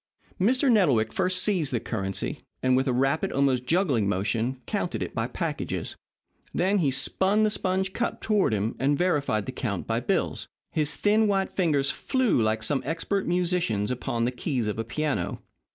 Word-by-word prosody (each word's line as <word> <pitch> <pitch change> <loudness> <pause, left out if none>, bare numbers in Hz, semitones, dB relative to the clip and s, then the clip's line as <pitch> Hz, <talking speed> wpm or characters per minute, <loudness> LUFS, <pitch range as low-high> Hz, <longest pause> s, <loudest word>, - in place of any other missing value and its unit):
Mr. 250 +8 +3
Nettlewick 140 - +3
first 185 0 +2
seized 180 -9 +1
the 120 - 0
currency, 95 -5 -3 0.2
and 130 0 +4
with 130 +2 +1
a - - +2
rapid, 135 +5 +1
almost 130 -2 +1
juggling 145 - +2
motion, 110 +6 -1
counted - - -2
it - - -6
by - - -1
packages. - - -3 0.6
Then 195 +3 +2
he 150 -6 +2
spun 190 +10 +2
the 215 - +3
sponge 190 -1 -1
cup 240 - -2
toward 210 - +2
him 105 +1 -1
and 140 +2 +2
verified 145 - +1
the - - -4
count - - -3
by - - 0
bills. - - -1 0.2
His 150 -1 0
thin, 215 +1 +3
white 195 -1 +1
fingers 150 -7 +1
flew 260 - +1
like 110 0 0
some 135 +4 +1
expert 165 +7 -2
musician's 170 - 0
upon 120 -1 -1
the 125 - 0
keys 125 -2 -2
of 105 +1 -3
a - - 0
piano. 120 - -2
145 Hz, 175 wpm, -26 LUFS, 120-190 Hz, 0.6 s, and